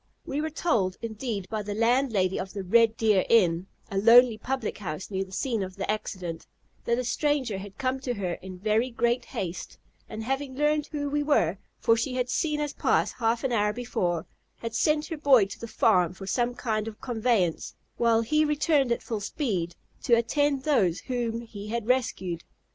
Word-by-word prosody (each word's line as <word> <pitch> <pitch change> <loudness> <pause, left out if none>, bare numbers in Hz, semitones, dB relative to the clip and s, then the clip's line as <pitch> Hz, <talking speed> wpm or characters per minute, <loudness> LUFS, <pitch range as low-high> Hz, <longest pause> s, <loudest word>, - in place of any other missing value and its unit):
We 285 +2 -2
were 315 - -2
told, 230 - 0
indeed, 220 -3 -4
by 215 -1 -3
the 205 0 -4
landlady 230 -5 +2
of 190 +1 -5
the 200 -1 -4
"Red 225 +4 +4
deer 215 -5 +3
Inn" 180 -5 +3 0.2
(a 195 - 0
lonely 235 +2 +7
public 255 -3 -3
house 180 0 -5
near 190 0 -1
the 190 - -14
scene 230 +2 -1
of 185 -1 -5
the 195 - -1
accident) 185 -6 -5 0.4
that 235 - +1
a 250 - -1
stranger 260 -5 0
had 195 0 -10
come 260 0 -1
to 250 -2 -3
her 185 -4 -2
in 185 -1 -8
very 215 +6 +1
great 240 +1 0
haste, 175 -3 -5 0.3
and, 220 0 -5
having 270 +2 -2
learned 295 +1 +1
who 290 -1 -3
we 295 +1 0
were, 195 - +2 0.2
for 230 -1 +3
she 245 +3 -2
had 250 0 -1
seen 300 +2 0
us 295 -1 -2
pass - - +1
half 230 0 0
an 265 - 0
hour 210 -2 +2
before, 175 -8 -2 0.3
had 230 -1 -6
sent 300 +6 +2
her 325 - -5
boy 270 -8 +5
to 195 - -9
the 230 - -6
farm 185 -6 +2
for 195 - -8
some 240 +4 0
kind 220 -3 -2
of 215 -1 -8
conveyance, 220 -8 0 0.2
while 230 -1 +3
he 305 +7 +2
returned 300 -3 +2
at 235 - 0
full 220 -3 -3
speed 190 - -2 0.3
to 235 - +4
attend 280 +3 +1
those 195 - +2
whom 235 -3 -2
he 210 -3 -9
had 230 0 -3
rescued. 225 -9 0
230 Hz, 195 wpm, -27 LUFS, 195-260 Hz, 0.4 s, lonely